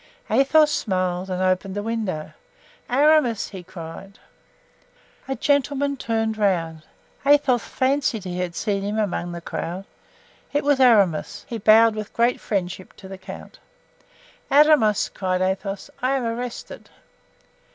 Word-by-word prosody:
Athos 295 +6 +4
smiled 185 -2 -1
and 185 0 -2
opened 185 +1 0
the 205 - -3
window. 215 -9 -3 0.6
"Aramis!" 275 -3 +3
he 190 -3 -8
cried. 180 +2 -10 1.1
A 270 - -2
gentleman 280 +2 +1
turned 225 -3 -2
around. 165 -6 0 0.4
Athos 280 -4 +4
fancied 260 -5 -1
he 180 -1 -5
had 175 -2 -3
seen 200 -2 -1
him 205 +2 -3
among 175 -4 -2
the 170 0 -7
crowd. 180 +3 -5 0.7
It 290 - +1
was 285 -1 +2
Aramis. 205 -11 +3
He 230 - -5
bowed 220 +2 +6
with 215 -1 -6
great 235 +1 +1
friendship 185 -2 -4
to 190 - -13
the 190 0 -9
count. 185 - -11 0.9
"Aramis," 285 -8 +4
cried 185 -1 -2
Athos, 190 +1 -2
"I 260 +2 +1
am 265 - -1
arrested." 235 +1 -6
215 Hz, 130 wpm, -23 LUFS, 185-255 Hz, 1.1 s, bowed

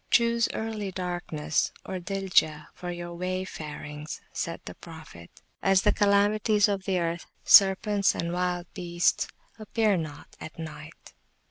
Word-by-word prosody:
Choose 235 0 +3
early 220 -2 -3
Darkness 175 -4 -2
(daljah) 180 -4 0
for 180 - -7
your 175 0 -5
Wayfarings, 160 -4 -5
said 165 0 -3
the - - -7
Prophet, 160 - -12 0.3
as 195 0 +4
the 210 - +4
Calamities 205 +1 +3
of 195 -2 -2
the 190 -1 +1
Earth 170 0 -2 0.2
(serpents 200 +1 +6
and 170 +1 -2
wild 180 -1 -1
beasts) 175 -2 +1 0.3
appear 215 -2 +1
not 155 -3 -7
at 160 - -9
Night. 155 -1 -9
180 Hz, 125 wpm, -27 LUFS, 165-200 Hz, 0.3 s, serpents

